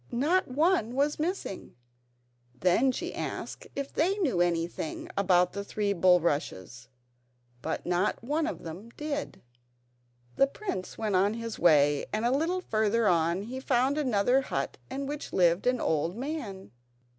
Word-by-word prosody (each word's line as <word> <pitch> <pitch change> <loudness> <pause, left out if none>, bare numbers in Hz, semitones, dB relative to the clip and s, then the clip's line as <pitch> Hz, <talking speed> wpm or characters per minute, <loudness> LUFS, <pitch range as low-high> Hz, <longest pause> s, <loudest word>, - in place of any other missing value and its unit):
Not 315 +10 +2
one 275 - +1
was 290 +3 +1
missing. 330 - -3 0.8
Then 220 +9 +3
she - - -4
asked - - -5
if 280 0 -4
they 370 +6 +1
knew 265 - +1
anything 170 -2 -1
about 180 -2 +3
the 200 +1 -4
three 205 0 -1
bulrushes, 165 - +1 0.7
but 160 - -3
not 180 +5 0
one 300 +5 0
of 320 - -5
them 175 +8 -8
did. 295 -1 -4 0.9
The 275 - +5
prince 280 - -5
went 215 -3 -1
on 200 +4 +3
his 230 -1 -5
way, 145 -4 +4
and 215 +2 -1
a 240 - +3
little 340 +5 0
further 220 - +1
on 170 +2 +2
he 250 +5 -6
found 260 +1 +1
another 250 -1 +2
hut 135 - -3
in 275 +1 -4
which 290 +1 -6
lived 175 +3 +3
an 250 -1 +2
old 160 +3 0
man. 245 - -5
220 Hz, 145 wpm, -29 LUFS, 175-280 Hz, 0.9 s, The